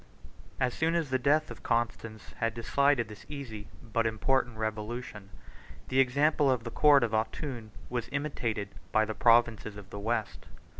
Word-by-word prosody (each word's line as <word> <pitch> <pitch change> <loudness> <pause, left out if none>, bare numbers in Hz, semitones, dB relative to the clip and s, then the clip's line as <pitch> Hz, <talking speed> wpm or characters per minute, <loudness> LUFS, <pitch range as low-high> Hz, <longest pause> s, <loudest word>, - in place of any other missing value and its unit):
] - - -23
As 125 -2 +1
soon 165 +1 +1
as 160 -5 -1
the 130 - +2
death 150 +4 +2
of - - -9
Constans 115 -2 -2
had 115 0 -1
decided 140 +1 +2
this 105 -2 -11
easy 120 -8 -7 0.2
but 115 0 0
important 120 +1 0
revolution, 110 -1 -4 0.6
the 130 - +2
example 140 +3 +3
of 125 -3 +1
the 115 - -6
court 145 -1 +6
of 115 - 0
Autun 115 +1 -2 0.2
was 120 -2 -3
imitated 120 -8 -2 0.2
by 110 0 +3
the 110 - -4
provinces 115 -3 +3
of 100 -1 -11
the 100 - -6
West. 110 0 -2
120 Hz, 165 wpm, -30 LUFS, 110-135 Hz, 0.6 s, court